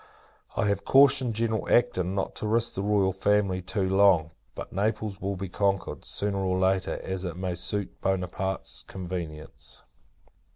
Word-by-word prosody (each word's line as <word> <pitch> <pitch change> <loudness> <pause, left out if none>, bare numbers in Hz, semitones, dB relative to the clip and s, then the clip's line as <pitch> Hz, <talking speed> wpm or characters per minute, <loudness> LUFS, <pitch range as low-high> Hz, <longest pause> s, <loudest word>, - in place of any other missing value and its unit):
I - - +2
have 100 -1 0
cautioned 135 -3 +5
General 110 -1 -1
Acton, 95 -7 +2
not 95 - -2
to 110 - -3
risk 115 +2 +2
the 95 - -3
Royal 100 -2 +2
Family 100 -1 +1
too 95 +1 -1
long; 95 -5 +4 0.2
but - - -7
Naples 105 0 -1
will 100 0 -2
be 95 +1 -5
conquered, 100 +1 -1
sooner 100 -1 -2
or 95 -1 0
later, 95 0 +1
as 95 -1 -4
it 90 -2 -4
may 90 -1 -2
suit 95 +3 -3
Buonaparte's 95 0 -2
convenience. 80 -8 -7
95 Hz, 155 wpm, -27 LUFS, 90-105 Hz, 0.2 s, cautioned